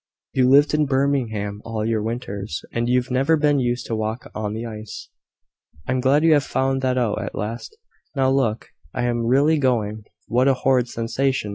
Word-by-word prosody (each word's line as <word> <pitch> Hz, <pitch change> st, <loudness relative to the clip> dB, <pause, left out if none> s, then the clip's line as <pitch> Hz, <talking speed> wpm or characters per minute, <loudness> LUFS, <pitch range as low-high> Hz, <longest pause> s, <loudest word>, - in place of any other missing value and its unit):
You've 130 Hz, -1 st, +3 dB
lived 145 Hz, +3 st, +5 dB
in 150 Hz, -1 st, +2 dB
Birmingham 120 Hz, -7 st, -1 dB
all 110 Hz, -1 st, -3 dB
your 110 Hz, -1 st, 0 dB
winters, 110 Hz, -3 st, -4 dB
and 120 Hz, +1 st, -1 dB
you've 125 Hz, 0 st, +1 dB
never 135 Hz, +6 st, +3 dB
been 145 Hz, -1 st, +2 dB
used 120 Hz, -1 st, -1 dB
to 115 Hz, -, -3 dB
walk 110 Hz, +2 st, -4 dB
on 105 Hz, -1 st, -3 dB
the 115 Hz, +2 st, -4 dB
ice." 110 Hz, -1 st, -8 dB, 0.8 s
"I -, -, -1 dB
am 130 Hz, -, +1 dB
glad 135 Hz, +4 st, +3 dB
you 165 Hz, -1 st, +6 dB
have 145 Hz, -2 st, +3 dB
found 135 Hz, 0 st, 0 dB
that 130 Hz, -1 st, 0 dB
out 120 Hz, -4 st, 0 dB
at -, -, -5 dB
last. 115 Hz, -, -5 dB, 0.4 s
Now, 130 Hz, -1 st, +2 dB
look 120 Hz, -5 st, 0 dB, 0.3 s
I 120 Hz, -, -1 dB
am 120 Hz, -1 st, 0 dB
really 145 Hz, +5 st, +3 dB
going. 110 Hz, -5 st, 0 dB, 0.2 s
What 125 Hz, +3 st, +2 dB
a 135 Hz, -, +4 dB
horrid 130 Hz, -1 st, +2 dB
sensation!" 120 Hz, 0 st, -1 dB
125 Hz, 190 wpm, -22 LUFS, 110-135 Hz, 0.8 s, you